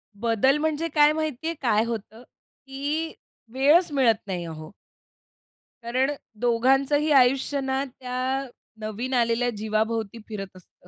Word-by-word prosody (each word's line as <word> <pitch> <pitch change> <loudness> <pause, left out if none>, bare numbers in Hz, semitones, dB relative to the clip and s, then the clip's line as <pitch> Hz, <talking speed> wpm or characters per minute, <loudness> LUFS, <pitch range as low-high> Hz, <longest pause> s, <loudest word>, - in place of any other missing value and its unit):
बदल 235 +6 +2
म्हणजे 315 +1 0
काय 295 0 +6
माहिती 310 -1 -3
आहे 335 - 0
काय 220 -3 +3
होतं? 225 0 -6 0.4
की 290 +4 -3 0.4
वेळच 295 +6 +4
मिळत 255 -6 +4
नाही 180 -3 -3
अहो. 155 +1 -8 1.1
कारण 255 +4 +1 0.3
दोघांचंही 270 +6 +2
आयुष्य 270 +1 +4
ना 265 +1 -1
त्या 255 +1 -3 0.3
नवीन 215 +5 -4
आलेल्या 240 0 +2
जीवाभोवती 220 +1 -1
फिरत 195 -4 -7
असतं. 180 0 -19
255 Hz, 120 wpm, -25 LUFS, 220-280 Hz, 1.1 s, काय